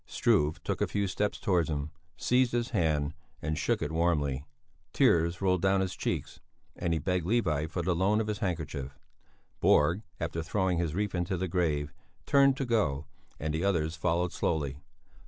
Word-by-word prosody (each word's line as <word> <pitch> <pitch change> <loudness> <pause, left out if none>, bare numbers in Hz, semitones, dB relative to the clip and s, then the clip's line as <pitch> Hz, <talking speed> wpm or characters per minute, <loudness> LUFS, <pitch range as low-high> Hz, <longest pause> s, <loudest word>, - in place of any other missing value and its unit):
Struve 75 +1 +1
took - - -2
a - - +2
few 100 -1 0
steps 105 +2 -1
towards 85 -4 +1
him, 75 0 -3 0.3
seized 125 0 +2
his 120 +1 -1
hand, 75 -7 +1 0.3
and 80 -1 -2
shook 75 - 0
it 75 - -3
warmly; 75 -5 0 0.5
tears 85 +2 +3
rolled 90 -2 +2
down 95 +1 +3
his 95 -1 -1
cheeks, - - -3 0.4
and 85 - -2
he 85 - +2
begged 90 +3 0
Levi 85 -9 +1
for 85 +2 -3
the 90 +1 +1
loan 100 +5 +2
of 110 - 0
his 105 -1 -3
handkerchief. 80 - -3 0.6
Borg, 85 +7 +4 0.2
after 80 - -2
throwing 90 +1 0
his 85 -2 -1
wreath 105 0 -1
into 90 +1 -1
the 95 +2 -1
grave, 80 -5 0 0.3
turned 140 -1 +5
to 135 - -1
go, 80 - +1 0.3
and 75 0 -2
the 80 +3 -1
others 85 -5 +1
followed 85 +1 0
slowly. 70 -5 -1
85 Hz, 175 wpm, -30 LUFS, 75-95 Hz, 0.6 s, turned